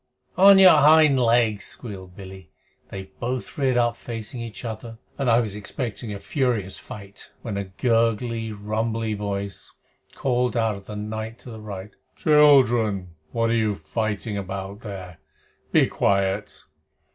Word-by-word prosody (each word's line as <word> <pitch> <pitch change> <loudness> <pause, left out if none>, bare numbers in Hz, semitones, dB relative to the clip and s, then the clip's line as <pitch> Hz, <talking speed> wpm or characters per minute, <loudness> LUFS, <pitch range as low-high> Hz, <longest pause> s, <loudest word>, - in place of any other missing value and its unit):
"On 195 +1 +8
your 190 -1 +8
hind 155 -2 +6
legs!" 115 -3 +2
squealed 95 -6 -9
Billy. 95 -1 -11 0.4
They 95 0 -8
both 125 +1 -4
reared 130 -3 +1
up 120 -1 +2
facing 115 0 -6
each 115 +1 -7
other, 115 0 -6 0.2
and 135 -3 +1
I 115 +1 +5
was 110 -5 -2
expecting 110 +2 -5
a 100 - -5
furious 120 - -1
fight, 100 -1 -10
when 110 -4 -4
a 100 0 -2
gurgly, 115 +2 0
rumbly 110 +2 -2
voice, 100 -1 -4 0.4
called 125 -2 0
out 115 -2 +1
of 100 -1 -11
the 105 - -7
darkness 110 +2 -6
to 125 - -9
the 110 -1 -9
right 100 -1 -7 0.2
"Children, 120 - +4 0.2
what 115 0 0
are - - +2
you 110 -3 +1
fighting 105 +5 -3
about 95 +1 -6
there? 95 -6 -8 0.5
Be - - +5
quiet." 100 +1 0
110 Hz, 145 wpm, -24 LUFS, 100-120 Hz, 0.5 s, On